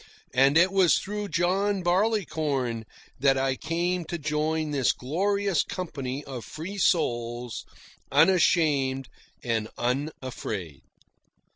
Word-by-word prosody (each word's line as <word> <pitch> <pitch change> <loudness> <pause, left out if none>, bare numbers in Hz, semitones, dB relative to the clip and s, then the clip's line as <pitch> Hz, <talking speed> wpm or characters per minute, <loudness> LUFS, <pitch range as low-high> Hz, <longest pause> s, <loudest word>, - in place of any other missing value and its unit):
And 135 +4 +5
it 185 +3 +5
was 185 -6 +4
through 210 +1 -4
John 185 +3 +1
Barleycorn 160 - 0 0.3
that 135 0 +4
I 135 0 +1
came 170 +4 -1
to 170 - -4
join 155 0 -1
this 135 -3 +2
glorious 195 +6 0
company 140 -6 -4
of 130 -5 -7
free 190 +6 -7
souls, 120 -9 0 0.5
unashamed 145 -5 +3 0.3
and 115 -3 -1
unafraid. 125 - -3
155 Hz, 105 wpm, -27 LUFS, 130-180 Hz, 0.5 s, And